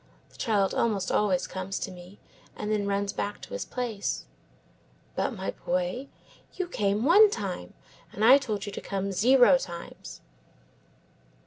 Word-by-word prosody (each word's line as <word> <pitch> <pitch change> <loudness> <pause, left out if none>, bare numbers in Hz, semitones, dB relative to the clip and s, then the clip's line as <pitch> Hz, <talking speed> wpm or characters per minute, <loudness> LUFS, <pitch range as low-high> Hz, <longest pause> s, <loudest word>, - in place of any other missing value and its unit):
The - - -21
child 205 -4 +1
almost 200 -5 0
always 195 -4 +2
comes 190 +1 -4
to - - -4
me, 180 +2 -13 0.4
and 210 - -4
then 205 -2 0
runs 200 0 -1
back 205 +1 -3
to - - -9
his - - -3
place. 235 -5 -3 0.9
"But, - - 0
my 190 -1 -3
boy, 180 +9 -2 0.5
you 370 - -2
came 210 - 0
one 410 +7 +7
time, 190 - -5 0.4
and 215 - 0
I 265 +4 +9
told 215 -7 -3
you 205 - -5
to - - -6
come 195 0 -3
zero 250 +7 +5
times." 170 -7 -8
205 Hz, 150 wpm, -27 LUFS, 190-245 Hz, 0.9 s, I